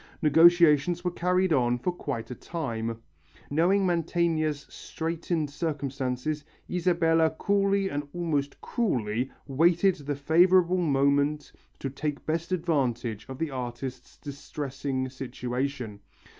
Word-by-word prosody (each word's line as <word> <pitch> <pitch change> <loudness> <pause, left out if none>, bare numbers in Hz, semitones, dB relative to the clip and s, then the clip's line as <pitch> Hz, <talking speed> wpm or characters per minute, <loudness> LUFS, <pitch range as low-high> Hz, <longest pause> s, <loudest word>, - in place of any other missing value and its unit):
Negotiations 165 +1 +5
were 180 - 0
carried 180 0 +1
on 125 -3 +2
for 180 +9 -1
quite 135 -9 -5
a - - -2
time. 115 -7 -4 0.5
Knowing 180 +6 +3
Mantegna's 165 -3 0
straightened 160 -2 -3
circumstances, 140 -2 -3 0.2
Isabella 170 -2 +2
coolly 200 -1 +2
and 145 -4 -3
almost 150 -5 -2
cruelly 125 - -1 0.2
waited 170 +6 +3
the 145 0 -4
favourable 175 +5 +4
moment 145 -1 +1 0.3
to 135 - -4
take 145 +1 -4
best 165 +2 -2
advantage 130 - -1
of 130 - -6
the 160 0 -2
artist's 125 0 -6
distressing 140 -2 -4
situation. 125 -3 -4
150 Hz, 110 wpm, -27 LUFS, 135-170 Hz, 0.5 s, Negotiations